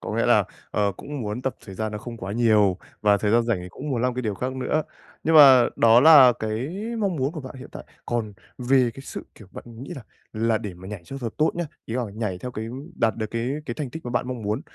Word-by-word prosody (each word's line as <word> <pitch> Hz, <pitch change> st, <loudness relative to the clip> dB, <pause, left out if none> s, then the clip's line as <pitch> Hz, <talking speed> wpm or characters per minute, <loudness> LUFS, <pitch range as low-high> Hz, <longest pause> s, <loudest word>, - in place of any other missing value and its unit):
Có -, -, -5 dB
nghĩa -, -, +1 dB
là, -, -, +4 dB, 0.3 s
ờ, 100 Hz, -1 st, +1 dB
cũng 145 Hz, -1 st, -7 dB
muốn 105 Hz, +4 st, -4 dB
tập 130 Hz, -, -2 dB
thời 95 Hz, -, -9 dB
gian 110 Hz, +1 st, -3 dB
nó 105 Hz, -, -4 dB
không 115 Hz, +1 st, -8 dB
quá 100 Hz, -2 st, -6 dB
nhiều 105 Hz, -5 st, +3 dB, 0.2 s
và 105 Hz, -1 st, +4 dB
thời 105 Hz, +1 st, -1 dB
gian 120 Hz, +1 st, +4 dB
rảnh 115 Hz, -5 st, 0 dB
thì 90 Hz, -, -8 dB
cũng 140 Hz, +10 st, -7 dB
muốn 120 Hz, -2 st, -1 dB
làm 125 Hz, -1 st, +1 dB
cái 125 Hz, -, -3 dB
điều 105 Hz, -3 st, -2 dB
khác 130 Hz, +5 st, -3 dB
nữa. 140 Hz, +4 st, 0 dB, 0.4 s
Nhưng 160 Hz, +1 st, +2 dB
mà 135 Hz, -5 st, +8 dB
đó 115 Hz, +1 st, +6 dB
là 140 Hz, -4 st, +9 dB
cái 110 Hz, +5 st, -3 dB, 0.3 s
mong 195 Hz, -5 st, 0 dB
muốn 135 Hz, +2 st, -1 dB
của 155 Hz, -, -6 dB
bạn 130 Hz, 0 st, -9 dB
hiện 130 Hz, -, -10 dB
tại. -, -, -9 dB, 0.2 s
Còn 115 Hz, -3 st, -2 dB, 0.3 s
về 125 Hz, -1 st, +3 dB
cái -, -, -9 dB
sự -, -, -8 dB
kiểu 105 Hz, -, -15 dB
bạn -, -, -9 dB, 0.2 s
nghĩ 140 Hz, -, -7 dB
là 130 Hz, -, -8 dB, 0.3 s
là 110 Hz, 0 st, +1 dB
để 100 Hz, -5 st, -6 dB
mà 95 Hz, +2 st, -11 dB
nhảy 100 Hz, -4 st, -7 dB
cho 135 Hz, -, -7 dB
thật 120 Hz, -3 st, -3 dB
tốt 155 Hz, -, +3 dB
nhá, 175 Hz, 0 st, -2 dB, 0.2 s
ý 115 Hz, -, -6 dB
là 125 Hz, -, 0 dB
nhảy 105 Hz, -5 st, -3 dB
theo 125 Hz, -, -6 dB
cái 110 Hz, 0 st, -5 dB, 0.3 s
đạt 115 Hz, -7 st, +1 dB
được 110 Hz, -, -2 dB
cái 115 Hz, +2 st, -2 dB, 0.2 s
cái 120 Hz, -, -3 dB
thành 140 Hz, -5 st, -5 dB
tích 160 Hz, 0 st, -8 dB
mà 120 Hz, -, -4 dB
bạn 125 Hz, +1 st, -1 dB
mong 125 Hz, -3 st, -5 dB
muốn, 105 Hz, +2 st, -1 dB
120 Hz, 275 wpm, -24 LUFS, 110-130 Hz, 0.4 s, là